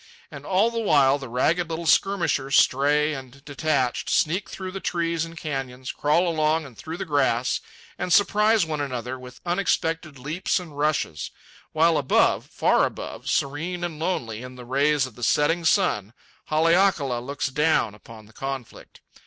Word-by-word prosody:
And -, -, -10 dB
all 200 Hz, +5 st, +3 dB
the 230 Hz, -, -2 dB
while 140 Hz, -10 st, +4 dB
the 135 Hz, -3 st, -8 dB
ragged 165 Hz, +8 st, +1 dB
little 165 Hz, +1 st, -4 dB
skirmishers, 165 Hz, -6 st, +2 dB
stray 150 Hz, +3 st, +3 dB
and 135 Hz, 0 st, -10 dB
detached, 145 Hz, -3 st, -1 dB
sneak 180 Hz, +6 st, +1 dB
through 185 Hz, -1 st, -6 dB
the 195 Hz, -, -5 dB
trees 170 Hz, -2 st, -1 dB
and 165 Hz, 0 st, -12 dB
canyons, 130 Hz, -5 st, -4 dB
crawl 160 Hz, +5 st, +1 dB
along 160 Hz, -1 st, +1 dB
and 130 Hz, -4 st, -12 dB
through 160 Hz, +8 st, -7 dB
the -, -, -4 dB
grass, 135 Hz, -6 st, +1 dB, 0.4 s
and 180 Hz, -, -3 dB
surprise 210 Hz, 0 st, +4 dB
one 155 Hz, -2 st, -3 dB
another 130 Hz, -2 st, -4 dB
with 125 Hz, 0 st, -12 dB
unexpected 165 Hz, -4 st, -1 dB
leaps 155 Hz, +10 st, -1 dB
and 165 Hz, -5 st, -10 dB
rushes; 145 Hz, -, -1 dB, 0.4 s
while 160 Hz, +1 st, +3 dB
above, 135 Hz, -, +2 dB
far -, -, +2 dB
above, -, -, -4 dB
serene 165 Hz, +6 st, -1 dB
and 165 Hz, -3 st, -4 dB
lonely 120 Hz, -10 st, -2 dB
in 125 Hz, 0 st, -9 dB
the 125 Hz, -1 st, -10 dB
rays 140 Hz, +2 st, +2 dB
of 130 Hz, -, -10 dB
the 120 Hz, -, -14 dB
setting 165 Hz, +7 st, +2 dB
sun, 120 Hz, -, +2 dB, 0.3 s
Haleakala 160 Hz, -5 st, +2 dB
looks 140 Hz, +3 st, -3 dB
down 150 Hz, -6 st, +1 dB
upon 110 Hz, +1 st, -14 dB
the 110 Hz, -, -20 dB
conflict. 135 Hz, -1 st, -7 dB
150 Hz, 160 wpm, -24 LUFS, 130-170 Hz, 0.4 s, while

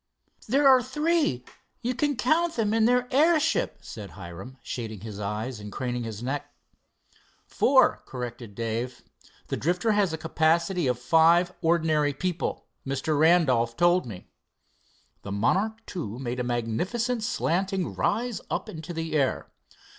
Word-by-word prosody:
"There 275 Hz, +5 st, +4 dB
are 260 Hz, -1 st, +7 dB
three 300 Hz, -, 0 dB, 0.4 s
you 245 Hz, +2 st, 0 dB
can 290 Hz, +2 st, 0 dB
count 315 Hz, +9 st, +1 dB
them 215 Hz, -2 st, 0 dB
in 225 Hz, -1 st, +3 dB
their 250 Hz, +1 st, +3 dB
airship," 310 Hz, +3 st, +3 dB
said 105 Hz, -5 st, -9 dB
Hiram, 95 Hz, +10 st, -10 dB
shading 110 Hz, -5 st, -5 dB
his 105 Hz, -2 st, -7 dB
eyes 105 Hz, +4 st, -4 dB
and 105 Hz, 0 st, -8 dB
craning 125 Hz, 0 st, -3 dB
his 110 Hz, 0 st, -6 dB
neck. 135 Hz, +3 st, -3 dB, 0.9 s
"Four," -, -, +3 dB
corrected 120 Hz, -4 st, -7 dB
Dave. 115 Hz, +3 st, -3 dB, 0.5 s
"The -, -, -1 dB
Drifter 180 Hz, +8 st, +1 dB
has 205 Hz, -4 st, +2 dB
a 160 Hz, -, -3 dB
capacity 165 Hz, +1 st, +1 dB
of 125 Hz, -1 st, +1 dB
five 165 Hz, +7 st, +4 dB
ordinary 160 Hz, -3 st, +2 dB
people, 175 Hz, +4 st, -3 dB, 0.2 s
Mr. 135 Hz, +3 st, -1 dB
Randolph 140 Hz, -9 st, +3 dB
told 175 Hz, -2 st, +3 dB
me." 100 Hz, -6 st, -10 dB, 0.9 s
The 100 Hz, -, -7 dB
Monarch 185 Hz, -, +1 dB, 0.2 s
II 120 Hz, -, -4 dB
made 125 Hz, -1 st, -4 dB
a -, -, 0 dB
magnificent 175 Hz, -, -1 dB
slanting 190 Hz, -2 st, -1 dB
rise 235 Hz, -4 st, -1 dB
up -, -, -2 dB
into 160 Hz, +1 st, -7 dB
the 165 Hz, -1 st, -4 dB
air. 140 Hz, -4 st, 0 dB
160 Hz, 140 wpm, -26 LUFS, -, 0.9 s, are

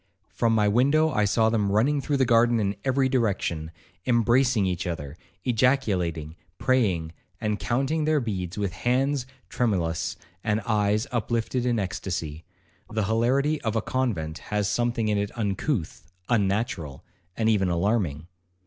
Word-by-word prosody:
From 115 Hz, -1 st, +1 dB
my 105 Hz, -1 st, +3 dB
window 140 Hz, +9 st, +3 dB
I 105 Hz, -6 st, +2 dB
saw 110 Hz, +3 st, +2 dB
them 105 Hz, -3 st, +1 dB
running 135 Hz, +8 st, +2 dB
through 145 Hz, 0 st, 0 dB
the 130 Hz, -, +3 dB
garden 115 Hz, 0 st, +4 dB
in 100 Hz, -1 st, 0 dB
every 135 Hz, 0 st, +2 dB
direction, 100 Hz, -10 st, -1 dB, 0.4 s
embracing 120 Hz, -1 st, +3 dB
each 90 Hz, -1 st, -2 dB
other, 75 Hz, -4 st, -5 dB, 0.3 s
ejaculating, 100 Hz, -, +1 dB, 0.2 s
praying, 95 Hz, -11 st, +1 dB, 0.3 s
and 105 Hz, -2 st, -1 dB
counting 135 Hz, +6 st, 0 dB
their 155 Hz, -1 st, +3 dB
beads 95 Hz, -7 st, -4 dB
with 100 Hz, -3 st, -1 dB
hands 130 Hz, +4 st, 0 dB, 0.2 s
tremulous, 90 Hz, -9 st, -1 dB, 0.3 s
and 110 Hz, -1 st, +1 dB
eyes 105 Hz, +1 st, +1 dB
uplifted 120 Hz, +1 st, -1 dB
in 120 Hz, -, +2 dB
extacy. 90 Hz, -5 st, -3 dB, 0.5 s
The 110 Hz, 0 st, -1 dB
hilarity 130 Hz, +8 st, +1 dB
of 110 Hz, -1 st, -2 dB
a 110 Hz, -, +2 dB
convent 95 Hz, -12 st, -2 dB
has 105 Hz, -1 st, -2 dB
something 120 Hz, +1 st, 0 dB
in 105 Hz, -1 st, +1 dB
it 100 Hz, 0 st, -1 dB
uncouth, 100 Hz, -, -2 dB, 0.2 s
unnatural, 100 Hz, -, -1 dB, 0.3 s
and 110 Hz, -, +1 dB
even 100 Hz, -4 st, +3 dB
alarming. 85 Hz, -4 st, 0 dB
110 Hz, 140 wpm, -26 LUFS, 95-125 Hz, 0.5 s, garden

